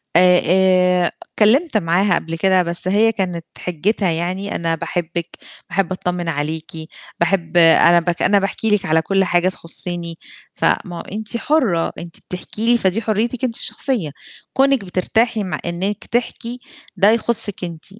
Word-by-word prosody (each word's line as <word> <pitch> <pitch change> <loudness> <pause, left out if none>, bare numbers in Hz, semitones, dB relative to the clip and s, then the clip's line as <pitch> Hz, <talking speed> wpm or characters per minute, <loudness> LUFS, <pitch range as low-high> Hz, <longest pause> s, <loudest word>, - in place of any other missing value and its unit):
آآ 180 0 +6 0.6
آآ - - -1
اتكلّمت 240 +5 +2
معاها 180 +1 +2
قبل 165 0 -3
كده 185 +1 +3
بس 170 +1 -5
هي 215 +4 +3
كانت 180 -5 -3
حجّتها 180 +2 0
يعني 185 +5 -2
أنا 165 -1 0
باحبِك، 170 +1 -4 0.3
باحب 185 0 -1
أتطمِن 180 -2 -3
عليكِ، 155 +1 -3 0.5
باحب 175 0 0
أنا 170 +1 +6
باك 170 0 -3
أنا 200 0 +4
باحكي 200 +3 -2
لِك 205 -2 +1
على 160 +1 +3
كل 195 +2 +1
حاجة 175 0 +2
تخصني، 170 -1 -6 0.4
فما 175 -2 0
هو - - -5
أنتِ 215 +3 -5
حُرة، 235 - +1
أنتِ 170 -1 -9
بتحكي 210 +4 -4
لي 240 - +5
فدي 195 +1 0
حريتِك 225 +3 -1
أنتِ 235 -2 -1
الشخصية، 225 - -2 0.4
كونِك 270 -5 +2
بترتاحي 220 +5 0
م 185 - -5
إنِّك 185 +4 -3
تحكي 240 0 -3 0.4
ده 200 +2 +5
يخصِك 225 -4 0
أنتِ، 165 -2 -7
185 Hz, 150 wpm, -19 LUFS, 170-215 Hz, 0.6 s, آآ